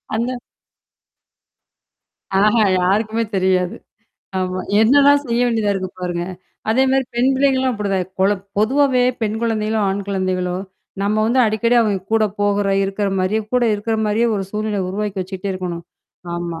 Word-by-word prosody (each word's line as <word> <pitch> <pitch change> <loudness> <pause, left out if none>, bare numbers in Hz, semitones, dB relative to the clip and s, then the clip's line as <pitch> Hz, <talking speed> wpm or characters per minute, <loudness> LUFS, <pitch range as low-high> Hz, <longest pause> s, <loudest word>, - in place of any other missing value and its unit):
அந்த 245 +3 -1 2.0
அஹ. 210 +3 +4 0.3
யாருக்குமே 215 +5 +1
தெரியாது. 185 -1 +1 0.6
ஆமா. 185 0 -2 0.2
என்னெல்லாம் 285 +5 +5
செய்ய 235 0 0
வேண்டியதா 220 -3 +1
இருக்கு 185 -1 -3
பாருங்க. 175 -1 -2 0.5
அதே 255 +4 +3
மாரி 265 0 +2
பெண் 245 +3 +3
பிள்ளைகள் 270 0 +2
எல்லாம் 260 -2 0
அப்படிதான். 195 -3 -1
கொழ 190 - +4 0.3
பொதுவாவே 260 +3 +3 0.2
பெண் 215 0 0
குழந்தைகளோ, 220 -1 0
ஆண் 195 +1 -2
குழந்தைகளோ, 185 -2 -1 0.5
நம்ம 205 +2 +1
வந்து 250 +3 +3
அடிக்கடி 220 +3 +1 0.3
கூடப் 215 -2 +1
போகுற 205 0 +1 0.2
இருக்கிற 195 +1 -1
மாரி, 185 +4 +1 0.2
கூட 250 - +3
இருக்கிற 220 +2 -2
மாரியே 225 +3 +2
ஒரு 195 - -2
சூழ்நிலை 210 -1 -2
உருவாக்கி 200 0 -3
வச்சிட்டே 190 +1 -5
இருக்கணும். 180 -2 -5 0.5
ஆமா. 170 -1 -4
210 Hz, 135 wpm, -19 LUFS, 190-230 Hz, 2.0 s, என்னெல்லாம்